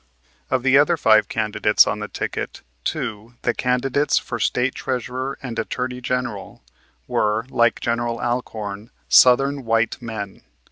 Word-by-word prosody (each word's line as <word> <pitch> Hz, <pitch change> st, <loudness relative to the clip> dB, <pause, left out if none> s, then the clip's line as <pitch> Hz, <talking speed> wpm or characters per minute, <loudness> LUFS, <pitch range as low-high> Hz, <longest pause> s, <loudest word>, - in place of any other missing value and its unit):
Of 130 Hz, -, 0 dB
the 135 Hz, +1 st, +5 dB
other 165 Hz, +3 st, +3 dB
five 110 Hz, -5 st, +4 dB
candidates 110 Hz, -1 st, +3 dB
on 105 Hz, -, -2 dB
the 105 Hz, -, -4 dB
ticket -, -, -5 dB, 0.2 s
two, 115 Hz, -5 st, -4 dB
the 120 Hz, -, +1 dB
candidates 130 Hz, +4 st, +1 dB
for 120 Hz, -, -3 dB
State 125 Hz, +2 st, +1 dB
Treasurer 130 Hz, +1 st, -3 dB
and 120 Hz, -3 st, -4 dB
Attorney 125 Hz, +2 st, -3 dB
General, 120 Hz, -5 st, -4 dB, 0.4 s
were, 105 Hz, +2 st, 0 dB
like 120 Hz, -1 st, +2 dB
General 115 Hz, 0 st, -1 dB
Alcorn, 110 Hz, -3 st, -4 dB, 0.2 s
Southern 135 Hz, +2 st, +5 dB
white 115 Hz, +2 st, 0 dB
men. 110 Hz, -4 st, -6 dB
120 Hz, 135 wpm, -22 LUFS, 110-130 Hz, 0.4 s, the